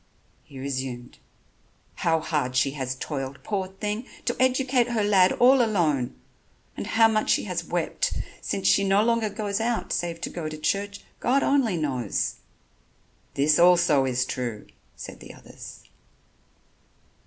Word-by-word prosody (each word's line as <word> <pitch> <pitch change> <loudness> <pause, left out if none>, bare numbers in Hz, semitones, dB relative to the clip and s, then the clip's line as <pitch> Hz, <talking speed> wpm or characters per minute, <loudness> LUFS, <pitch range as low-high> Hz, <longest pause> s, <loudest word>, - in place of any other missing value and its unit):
He 135 - -14
resumed: 130 - -5 0.8
"How 160 -1 +1
hard 145 -6 -2
she 130 +2 +2
has 130 -2 -4
toiled, 135 -1 -5
poor 195 0 -2
thing, 210 +5 -4 0.2
to 240 - 0
educate 255 -1 +2
her 235 -3 0
lad 195 -3 +4
all 255 +2 +5
alone, 160 - 0 0.6
and - - -5
how 225 0 +5
much 215 -1 0
she - - +3
has - - -3
wept - - -1 0.3
since 195 - -2
she 200 - +4
no 195 +1 +3
longer 230 -1 +1
goes 205 0 -3
out, 235 0 -1
save 170 -1 -2
to - - -4
go 160 -3 -4
to 155 - -7
church, 200 +6 -2 0.2
God 270 +3 +2
only 255 -10 +2
knows." 130 - -2 1.0
"This 150 +3 +3
also 170 -5 +5
is 125 -1 0
true," 120 -5 -4 0.3
said - - -9
the - - -12
others. - - -12
180 Hz, 145 wpm, -25 LUFS, 135-220 Hz, 1.0 s, all